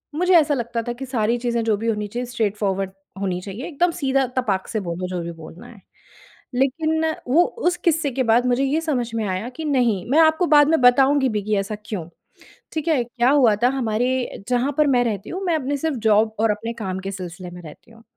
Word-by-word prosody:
मुझे 360 Hz, +3 st, +2 dB
ऐसा 300 Hz, -2 st, +3 dB
लगता 235 Hz, -2 st, -2 dB
था 240 Hz, -, -1 dB
कि 270 Hz, +3 st, -7 dB
सारी 235 Hz, -2 st, 0 dB
चीजें 235 Hz, -1 st, -1 dB
जो 220 Hz, -2 st, +2 dB
भी 225 Hz, +3 st, -4 dB
होनी 210 Hz, -2 st, -1 dB
चाहिए 240 Hz, +4 st, -4 dB
स्ट्रेट 225 Hz, -4 st, -1 dB
फॉरवर्ड 195 Hz, -2 st, -1 dB, 0.3 s
होनी 180 Hz, -2 st, -1 dB
चाहिए 200 Hz, +7 st, -7 dB
एकदम 345 Hz, +2 st, +1 dB
सीधा 270 Hz, -5 st, 0 dB
तपाक 200 Hz, -7 st, 0 dB
से 220 Hz, -, -2 dB
बोलो 180 Hz, +2 st, -3 dB
जो 180 Hz, -1 st, -4 dB
भी 170 Hz, -, -5 dB
बोलना 165 Hz, +1 st, -12 dB
है। 205 Hz, -5 st, -15 dB, 0.7 s
लेकिन 315 Hz, +5 st, +1 dB, 0.2 s
वो 315 Hz, +8 st, +5 dB, 0.3 s
उस 355 Hz, -, -3 dB
किस्से 320 Hz, -4 st, +1 dB
के 260 Hz, +1 st, -1 dB
बाद 235 Hz, +2 st, +3 dB
मुझे 250 Hz, +2 st, +2 dB
ये 305 Hz, +4 st, 0 dB
समझ 255 Hz, -7 st, -1 dB
में 220 Hz, -, -1 dB
आया 190 Hz, +6 st, -3 dB
कि 315 Hz, +4 st, -7 dB
नहीं, 240 Hz, -10 st, +1 dB
मैं 300 Hz, -, +5 dB
आपको 320 Hz, +2 st, +4 dB
बाद 295 Hz, -2 st, +6 dB
में 320 Hz, -4 st, +2 dB
बताऊँगी 265 Hz, +2 st, +5 dB
भी 210 Hz, -2 st, -1 dB
कि 215 Hz, 0 st, 0 dB
ऐसा 195 Hz, +2 st, -2 dB
क्यों? 180 Hz, -8 st, -5 dB, 0.7 s
ठीक 315 Hz, 0 st, -3 dB
है। 295 Hz, -7 st, +2 dB
क्या 240 Hz, +1 st, 0 dB
हुआ 255 Hz, -7 st, +4 dB
था 245 Hz, -, +5 dB
हमारे 245 Hz, -1 st, -1 dB
जहाँ 250 Hz, +3 st, +1 dB
पर 300 Hz, -1 st, +4 dB
मैं 250 Hz, -3 st, +3 dB
रहती 215 Hz, -4 st, -3 dB
हूँ 370 Hz, -, -5 dB
मैं 340 Hz, -, +1 dB
अपने 285 Hz, -1 st, -1 dB
सिर्फ़ 310 Hz, -1 st, -2 dB
जॉब 220 Hz, +1 st, +3 dB
और 225 Hz, -1 st, +3 dB
अपने 225 Hz, +3 st, -4 dB
काम 190 Hz, -5 st, -4 dB
के 195 Hz, +1 st, -5 dB
सिलसिले 180 Hz, -1 st, -7 dB
में 180 Hz, -, -10 dB
रहती 165 Hz, +8 st, -14 dB
हूँ। 225 Hz, 0 st, -18 dB
240 Hz, 230 wpm, -22 LUFS, 210-280 Hz, 0.7 s, बाद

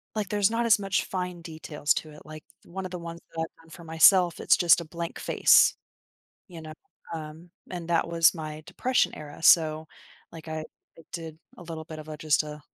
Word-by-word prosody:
like, 210 Hz, -3 st, -2 dB
there's 205 Hz, +1 st, +2 dB
not 235 Hz, +1 st, 0 dB
as 220 Hz, -3 st, +5 dB
much 195 Hz, -1 st, -1 dB
fine 180 Hz, -2 st, -4 dB
details 155 Hz, -3 st, -2 dB
to 155 Hz, -, -5 dB
it. 150 Hz, -, -14 dB
Like, 155 Hz, 0 st, -10 dB, 0.2 s
one 190 Hz, +2 st, -7 dB
of 185 Hz, -, -6 dB
the 180 Hz, -, -5 dB
ones 170 Hz, 0 st, -8 dB, 0.2 s
that 160 Hz, -, -2 dB
I've 160 Hz, 0 st, -7 dB
done -, -, -20 dB
for 170 Hz, 0 st, -12 dB
myself, 170 Hz, +2 st, +5 dB
it's -, -, +4 dB
just 170 Hz, -1 st, +5 dB
a -, -, -8 dB
blank 170 Hz, +1 st, -6 dB
face, -, -, +5 dB, 0.7 s
you 170 Hz, -2 st, -10 dB
know? 155 Hz, 0 st, -9 dB, 0.4 s
Um, 160 Hz, +2 st, -9 dB, 0.2 s
and 175 Hz, -2 st, -6 dB
that 170 Hz, -1 st, +1 dB
was 165 Hz, +1 st, +4 dB
my 155 Hz, -1 st, -7 dB
depression 255 Hz, 0 st, 0 dB
era, 150 Hz, +1 st, -11 dB
so, 160 Hz, -2 st, +4 dB, 0.5 s
like, 165 Hz, -1 st, -11 dB
I 155 Hz, 0 st, -4 dB, 0.3 s
I -, -, -13 dB
did 160 Hz, -2 st, -7 dB, 0.2 s
a -, -, -12 dB
little 160 Hz, -2 st, -7 dB
bit 155 Hz, -1 st, -9 dB
of 155 Hz, -, -12 dB
a 155 Hz, -, -6 dB
just 155 Hz, 0 st, +1 dB
a, 150 Hz, 0 st, -9 dB
165 Hz, 210 wpm, -27 LUFS, 155-175 Hz, 0.7 s, as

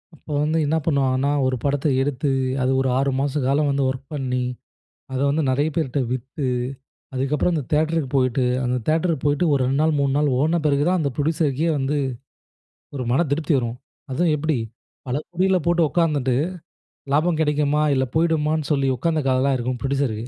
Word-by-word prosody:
அப்போ 155 Hz, -, -12 dB
வந்து 155 Hz, +2 st, +1 dB
என்ன 155 Hz, +3 st, +1 dB
பண்ணுவாங்கன்னா, 140 Hz, -2 st, +1 dB, 0.2 s
ஒரு 130 Hz, -, 0 dB
படத்த 145 Hz, +1 st, 0 dB
எடுத்து 140 Hz, 0 st, -1 dB, 0.3 s
அது 130 Hz, +1 st, +1 dB
ஒரு 135 Hz, -, 0 dB
6 140 Hz, 0 st, +1 dB
மாச 140 Hz, 0 st, -1 dB
காலம் 145 Hz, +2 st, +2 dB
வந்து 140 Hz, 0 st, +1 dB
ஒர்க் 130 Hz, +1 st, -5 dB
பண்ணி 130 Hz, -3 st, -1 dB, 0.7 s
அதை 130 Hz, -, -2 dB
வந்து 155 Hz, +3 st, +1 dB
நிறைய 140 Hz, +4 st, +2 dB
பேர்ட்ட 145 Hz, -4 st, 0 dB
வித்து 130 Hz, +3 st, -4 dB, 0.7 s
அதுக்கப்புறம் 140 Hz, +6 st, 0 dB
அந்த 150 Hz, -, -1 dB
தியேட்டருக்கு 155 Hz, -1 st, +1 dB, 1.2 s
போயிட்டு 145 Hz, +4 st, +2 dB
ஒரு 140 Hz, -, +2 dB
2 135 Hz, +3 st, 0 dB
நாள் 160 Hz, 0 st, +2 dB
3 140 Hz, -1 st, +1 dB
நாள் 145 Hz, -1 st, +2 dB
ஓட்ன 160 Hz, +4 st, +2 dB
பிறகு 145 Hz, -1 st, +3 dB
தான் 185 Hz, 0 st, +2 dB
அந்த 145 Hz, -3 st, 0 dB
ப்ரொடியூசருக்கே 155 Hz, 0 st, 0 dB
வந்து 140 Hz, +2 st, -1 dB, 1.0 s
ஒரு 130 Hz, -, -3 dB
மன 165 Hz, +7 st, +3 dB
திருப்தி 155 Hz, +1 st, 0 dB
வரும். 120 Hz, -1 st, -3 dB, 0.3 s
அதுவும் 160 Hz, +5 st, +1 dB
எப்படி 155 Hz, 0 st, 0 dB, 0.5 s
பல 125 Hz, +1 st, -1 dB
கோடிகள 185 Hz, +1 st, +2 dB
போட்டு 170 Hz, 0 st, +3 dB
உட்காந்துட்டு, 145 Hz, -7 st, +1 dB, 0.8 s
லாபம் 160 Hz, +2 st, +2 dB
கிடைக்குமா? 150 Hz, 0 st, +1 dB
இல்ல 130 Hz, 0 st, +1 dB
போயிடுமான்னு 160 Hz, -2 st, +1 dB
சொல்லி 140 Hz, -2 st, +2 dB
உட்காந்த 160 Hz, +5 st, 0 dB
கதலாம் 130 Hz, +1 st, +2 dB
இருக்கும் 125 Hz, 0 st, -3 dB
ப்ரொடியூசருக்கு. 135 Hz, -5 st, -1 dB
145 Hz, 160 wpm, -22 LUFS, 135-155 Hz, 1.2 s, பிறகு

